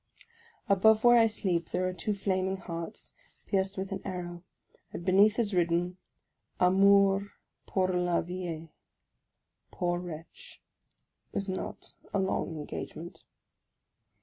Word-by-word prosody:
Above 215 +3 +5
where 240 0 +7
I 225 - +6
sleep 180 -6 -1
there 185 - 0
are 185 - -2
two 205 +3 -2
flaming 190 -1 0
hearts, 170 +1 -7 0.3
pierced 195 -1 0
with 190 +1 -4
an 195 -1 -3
arrow; 175 -2 -5 0.5
and 170 - -7
beneath 200 +3 +5
is 220 -4 0
written 175 0 +1 0.3
" - - -46
Amour 200 +1 +4 0.4
pour 185 -1 +1
la 180 -1 +1
vie." 170 -3 -6 1.0
Poor 175 0 -1
wretch! 170 -2 -10 0.7
it - - -20
was 200 - -1
not 190 -1 -5 0.2
a - - +3
long 190 -3 -1
engagement. 160 +3 -7
185 Hz, 125 wpm, -30 LUFS, 175-200 Hz, 1.0 s, where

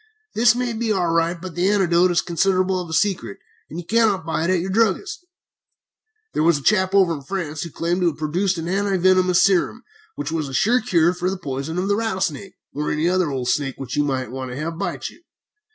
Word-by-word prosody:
This 230 +1 +4
may 245 -1 -2
be 225 0 -2
all 180 -5 +1
right, 165 +1 +1
but 185 0 -8
the 180 +3 +1
antidote 185 -3 +3
is 175 - +2
considerable 185 +1 +1
of 175 - -8
a - - -6
secret, 175 - 0 0.3
and 160 - -8
you 175 - -8
cannot 215 -4 +2
buy 160 0 -1
it - - 0
at 185 -1 +2
your 185 +3 -3
druggist's. 225 - 0 1.1
"There - - 0
was 165 -1 +4
a 145 - -9
chap 190 0 +2
over 185 -4 +4
in 145 - -6
France 155 -1 -4
who 170 - -5
claimed 170 +3 -2
to 175 - +3
have 165 - -1
produced 175 +5 -1
an 165 0 -4
anti 195 +1 0
venomous 185 0 +4
serum 195 +5 +1 0.3
which 145 +2 -4
was 155 -4 -2
a 135 - -5
sure 240 - +3
cure 170 -4 +2
for 180 0 -2
the 195 - -3
poison 140 0 -5
of 185 +2 -1
a 200 - +2
rattlesnake, 195 -4 -2 0.2
or 150 +2 -2
any 155 +3 0
other 185 -2 +1
old 130 -3 -3
snake 135 -2 0
which 135 -2 -6
you 145 - +2
might 130 -4 -2
want 130 0 -5
to 125 - -6
have 165 +2 -4
bite - - -3
you. - - -19
175 Hz, 230 wpm, -21 LUFS, 155-195 Hz, 1.1 s, This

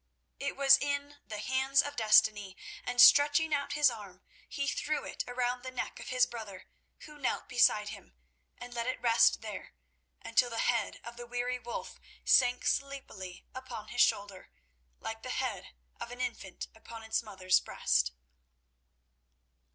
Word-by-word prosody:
It 280 +1 -3
was 275 0 +6
in 285 0 -3
the 215 - -6
hands 265 +5 +2
of 285 0 -6
destiny, 215 -3 +3 0.3
and 245 0 -4
stretching 290 +4 +7
out 285 -1 -1
his 295 -3 +4
arm, 200 -5 -11 0.3
he 280 0 -3
threw 305 +2 -2
it - - -4
around 245 0 -2
the 260 - -6
neck 255 -1 -5
of - - -9
his 255 -1 +3
brother, 210 -5 -9 0.4
who 300 -1 -13
knelt 265 - -2
beside 210 -4 +3
him, 200 - -11 0.4
and 245 0 -10
let 235 0 -3
it 255 - -2
rest 230 -1 +4
there, 215 -3 -8 0.5
until 245 - +2
the 230 - -6
head 240 0 0
of 235 0 -10
the 240 0 -8
weary 245 +1 -2
Wulf 240 -1 -7 0.3
sank 250 -1 +4
sleepily 260 -10 -4
upon 255 -4 -8
his 245 - +1
shoulder, 200 -2 0 0.5
like - - -6
the - - -7
head - - -3 0.3
of - - -6
an 245 +1 -9
infant 235 -7 -5
upon 225 0 -11
its 220 +1 -1
mother's 190 -4 +1
breast. - - 0
245 Hz, 160 wpm, -31 LUFS, 215-270 Hz, 0.5 s, stretching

